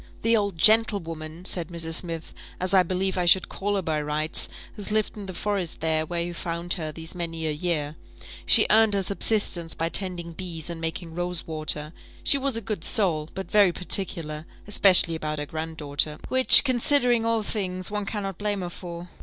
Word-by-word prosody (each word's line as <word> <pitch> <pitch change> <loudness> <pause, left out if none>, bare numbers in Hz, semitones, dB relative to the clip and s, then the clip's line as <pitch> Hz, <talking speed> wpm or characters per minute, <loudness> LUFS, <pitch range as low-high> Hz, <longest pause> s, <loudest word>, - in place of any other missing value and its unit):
"The 230 +1 +3
old 200 -5 -1
gentlewoman," 170 -5 +3
said 175 -4 -1
Mrs. 165 -1 -5
Smith, 165 -2 -3 0.3
"as 185 +1 0
I 190 - +6
believe 185 +1 -2
I 180 - 0
should 185 +2 +4
call 205 +1 -3
her 195 - -2
by 155 -2 -2
rights, 150 +2 -2 0.3
has 205 -1 -5
lived 215 0 -1
in 205 -2 -8
the 185 - -6
forest 195 -5 -3
there, 160 -1 -1
where 170 0 -2
you 175 0 -5
found 170 0 -3
her, 160 -4 -4
these 160 +1 -5
many 165 -2 -5
a 155 - -1
year 150 -1 -3 0.5
she - - +7
earned 220 -1 +5
her 195 - 0
subsistence 190 -3 0
by 165 0 -2
tending 175 -1 -3
bees 170 -2 -5
and 165 -1 -8
making 165 +1 -5
rose 175 0 -2
water 155 -1 -1 0.3
she 280 - +5
was 270 -3 0
a - - -4
good 210 -5 -5
soul, 165 -9 +1
but 190 0 -7
very 205 -3 +4
particular, 165 -4 0 0.2
especially 190 -4 +5
about 155 -1 -4
her 145 - -4
grand 160 +1 -6
daughter, 150 +1 -1
which, 260 0 +8
considering 250 -2 +2
all 230 -1 0
things, 185 -3 -4
one 210 -1 -4
cannot 195 -4 -4
blame 205 -1 -2
her 175 -1 -5
for. 175 -1 -8
175 Hz, 195 wpm, -24 LUFS, 160-200 Hz, 0.5 s, which